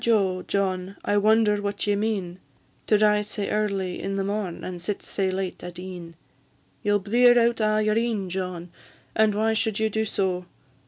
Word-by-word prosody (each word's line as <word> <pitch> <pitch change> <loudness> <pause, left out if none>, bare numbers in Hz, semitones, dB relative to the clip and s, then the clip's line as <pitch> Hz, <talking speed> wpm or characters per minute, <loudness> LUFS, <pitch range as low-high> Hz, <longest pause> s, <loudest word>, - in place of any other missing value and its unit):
John - - 0
Anderson, 190 -3 +1
my 185 - -6
jo, - - -14
John, 190 -1 -1
I 205 - +2
wonder 210 0 +3
what 205 0 -2
ye 205 -1 +2
mean, 200 -4 -2 0.5
To 215 - +5
rise 210 0 +3
sae 205 -1 -3
early 200 -4 -1
in 195 0 -3
the 195 - 0
morn, 200 -3 -3
And 180 -1 -6
sit 195 +3 -3
sae 195 -2 -1
late 185 -1 -4
at 175 0 -7
e'en; 180 -2 -8 0.7
Ye 205 - 0
'll 205 - +5
blear 240 +5 +4
out 235 -1 +3
a' 215 0 +2
your 215 0 +2
een, 225 -5 -1
John, 180 -1 -4 0.4
And 215 -1 +3
why 220 +1 +2
should 220 -2 0
you 220 0 0
do 220 +1 0
so? 185 -3 -1
205 Hz, 205 wpm, -25 LUFS, 185-215 Hz, 0.7 s, To